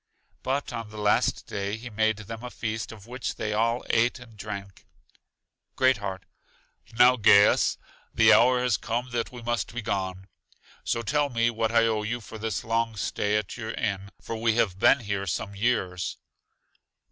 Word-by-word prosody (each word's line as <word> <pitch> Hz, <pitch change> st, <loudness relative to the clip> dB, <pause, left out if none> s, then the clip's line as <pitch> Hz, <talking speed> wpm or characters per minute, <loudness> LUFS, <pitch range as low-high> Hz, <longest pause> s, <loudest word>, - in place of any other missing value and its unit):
But 135 Hz, 0 st, -2 dB
on 115 Hz, -2 st, -5 dB
the 110 Hz, -, -11 dB
last 105 Hz, 0 st, +1 dB
day 100 Hz, +1 st, -3 dB
he 120 Hz, +1 st, -9 dB
made 110 Hz, 0 st, +1 dB
them 110 Hz, +2 st, -8 dB
a 125 Hz, -, -5 dB
feast, 110 Hz, -2 st, -4 dB
of 105 Hz, -3 st, -12 dB
which 125 Hz, +2 st, -5 dB
they 105 Hz, -, -3 dB
all 115 Hz, +3 st, 0 dB
ate 115 Hz, +3 st, +2 dB
and 120 Hz, -3 st, -14 dB
drank. 100 Hz, -1 st, -8 dB, 0.9 s
Great 130 Hz, -2 st, +4 dB
heart: 95 Hz, -2 st, -5 dB, 0.7 s
Now, 125 Hz, +1 st, +7 dB
Gaius, 100 Hz, -2 st, +5 dB, 0.3 s
the -, -, +6 dB
hour 125 Hz, +1 st, +5 dB
has 125 Hz, -3 st, +2 dB
come 120 Hz, +3 st, -3 dB
that 115 Hz, -1 st, -2 dB
we 120 Hz, -2 st, -10 dB
must 120 Hz, 0 st, -2 dB
be 120 Hz, -, -3 dB
gone; 95 Hz, -3 st, -3 dB, 0.6 s
so 115 Hz, -, -1 dB
tell 145 Hz, +4 st, +1 dB
me 115 Hz, -1 st, +1 dB
what 115 Hz, 0 st, -1 dB
I 115 Hz, 0 st, +4 dB
owe 110 Hz, -2 st, +1 dB
you 115 Hz, +3 st, -3 dB
for 110 Hz, -1 st, -10 dB
this 110 Hz, -2 st, -3 dB
long 115 Hz, 0 st, 0 dB
stay 105 Hz, 0 st, 0 dB
at 105 Hz, -, -4 dB
your 110 Hz, -2 st, -5 dB
inn, 100 Hz, 0 st, -3 dB
for 115 Hz, -, -6 dB
we 115 Hz, 0 st, +1 dB
have 95 Hz, -5 st, +1 dB
been 140 Hz, -, +5 dB
here 100 Hz, -2 st, -3 dB
some 100 Hz, +3 st, -3 dB
years. 100 Hz, -5 st, -1 dB
110 Hz, 180 wpm, -26 LUFS, 105-120 Hz, 0.9 s, Now